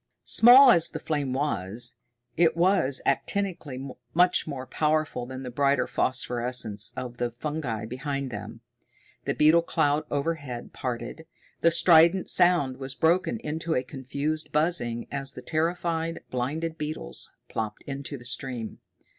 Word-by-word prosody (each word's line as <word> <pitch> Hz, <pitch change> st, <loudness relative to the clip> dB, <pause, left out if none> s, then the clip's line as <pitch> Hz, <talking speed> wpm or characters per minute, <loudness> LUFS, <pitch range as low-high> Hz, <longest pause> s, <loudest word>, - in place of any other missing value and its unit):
Small 250 Hz, +3 st, +8 dB
as 170 Hz, -7 st, +4 dB
the 160 Hz, -, -6 dB
flame 145 Hz, -4 st, -2 dB
was, 120 Hz, -6 st, -2 dB, 0.4 s
it 165 Hz, 0 st, +3 dB
was 170 Hz, -7 st, +2 dB
actinically 145 Hz, -10 st, -2 dB, 0.2 s
much 180 Hz, 0 st, +3 dB
more 135 Hz, -4 st, -5 dB
powerful 150 Hz, -3 st, -1 dB
than 130 Hz, +1 st, -7 dB
the 125 Hz, -, -6 dB
brighter 140 Hz, +2 st, +2 dB
phosphorescence 120 Hz, -4 st, -1 dB
of 125 Hz, -1 st, -6 dB
the 120 Hz, -1 st, -1 dB
fungi 120 Hz, -3 st, -4 dB
behind 135 Hz, +2 st, -4 dB
them. 110 Hz, +2 st, -8 dB, 0.6 s
The -, -, -1 dB
beetle 155 Hz, +3 st, +5 dB
cloud 155 Hz, -2 st, 0 dB
overhead 140 Hz, -5 st, -4 dB
parted. 125 Hz, +5 st, -5 dB, 0.3 s
The 170 Hz, -, +4 dB
strident 170 Hz, +2 st, +5 dB
sound 145 Hz, -8 st, +3 dB
was 135 Hz, -1 st, -5 dB
broken 180 Hz, +7 st, +1 dB
into 160 Hz, +2 st, -3 dB
a 125 Hz, -, 0 dB
confused 145 Hz, +3 st, -4 dB
buzzing 150 Hz, -7 st, +1 dB
as 140 Hz, 0 st, -2 dB
the 125 Hz, -, -10 dB
terrified, 165 Hz, +1 st, -1 dB
blinded 155 Hz, +6 st, -3 dB
beetles 150 Hz, -, -4 dB, 0.2 s
plopped 110 Hz, -1 st, -5 dB
into 140 Hz, 0 st, -6 dB
the 120 Hz, -, -14 dB
stream. 125 Hz, -2 st, -3 dB
140 Hz, 135 wpm, -26 LUFS, 125-160 Hz, 0.6 s, Small